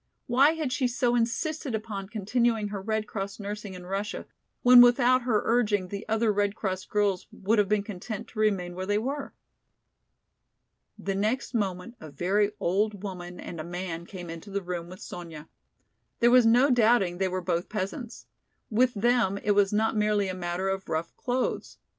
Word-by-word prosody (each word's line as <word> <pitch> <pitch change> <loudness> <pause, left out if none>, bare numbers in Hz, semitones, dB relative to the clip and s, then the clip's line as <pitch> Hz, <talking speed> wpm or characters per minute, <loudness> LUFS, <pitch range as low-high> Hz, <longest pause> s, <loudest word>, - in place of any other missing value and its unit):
Why 275 +5 +4
had 310 -6 -2
she 255 -1 +1
so 245 0 +1
insisted 245 +3 -1
upon 205 -3 -5
continuing 220 0 0
her 200 -1 -5
Red 220 +1 -1
Cross 200 -1 -5
nursing 205 -1 -6
in 180 0 -10
Russia, 195 +3 -3 0.4
when 245 0 +9
without 245 +1 +5
her 235 -4 +1
urging 210 -5 +1
the 200 +2 -7
other 220 0 +2
Red 205 0 0
Cross 190 -3 -3
girls 205 -3 0
would 210 +3 0
have 200 -1 +2
been 210 -1 +2
content 205 +1 -6
to 220 - -9
remain 195 -5 +1
where 185 +1 -5
they 205 0 +2
were? 275 +6 -4 1.6
The 195 - -3
next 215 +8 -1
moment 205 +1 -2
a 155 - -9
very 190 +8 +1
old 205 +2 0
woman 180 -3 -7
and 170 - -7
a - - -3
man 170 0 -5
came 180 -4 -8
into 165 +5 -9
the 200 0 -3
room 175 -1 -5
with 185 +3 -11
Sonya. 165 -3 -8 0.7
There 240 0 +5
was 250 -2 +6
no 250 +5 +5
doubting 220 -7 +3
they 190 - +2
were 185 0 -2
both 170 -1 -2
peasants. 215 +4 -5 0.5
With 245 +3 +3
them 225 -2 +2
it 210 - +2
was 200 -1 +3
not 220 +2 +1
merely 210 -1 +2
a - - -2
matter 180 +1 -3
of 190 0 -3
rough 160 +1 -3
clothes. 250 0 -2
205 Hz, 180 wpm, -27 LUFS, 185-235 Hz, 1.6 s, when